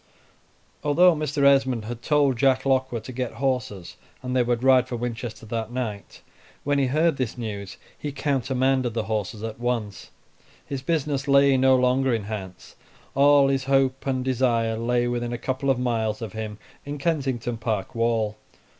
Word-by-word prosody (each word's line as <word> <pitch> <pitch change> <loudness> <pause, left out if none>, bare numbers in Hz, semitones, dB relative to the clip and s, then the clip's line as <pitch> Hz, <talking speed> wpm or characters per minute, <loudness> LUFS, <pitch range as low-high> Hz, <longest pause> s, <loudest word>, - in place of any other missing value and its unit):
Although 170 +4 +5
Mr. 150 -1 -1
Esmond 135 -5 +3
had 120 +1 -6
told 145 -2 +2
Jack 130 +1 +2
Lockwood 130 -4 0
to 130 - -8
get 125 -1 -4
horses 125 -9 -3 0.3
and 125 0 -3
they 125 - +4
would 120 0 0
ride 130 -1 +5
for 125 - -4
Winchester 120 -1 -5
that 110 0 -4
night, 115 -5 -5 0.4
when 145 0 +1
he 135 - +2
heard 155 +3 +2
this 130 -2 -3
news 100 -5 -6 0.2
he 145 - -4
countermanded 130 -3 0
the 115 - 0
horses 110 0 -3
at 115 0 -5
once; 120 -5 -3 0.6
his 140 -2 -5
business 145 -2 -1
lay 140 0 +5
no 130 0 +5
longer 130 0 +2
in 110 - -3
Hants; 100 -3 -8 0.4
all 140 0 +5
his 135 -1 0
hope 135 0 +1
and 130 -1 -1
desire 120 -3 +1
lay 120 +2 0
within 120 0 -2
a - - -2
couple 130 +3 -2
of 135 - +3
miles 115 -4 -1
of 115 -5 -6
him 110 -1 -5 0.3
in 145 +1 -5
Kensington 135 -7 -1
Park 110 -4 -3
wall. 115 -2 0
125 Hz, 170 wpm, -24 LUFS, 115-135 Hz, 0.6 s, Although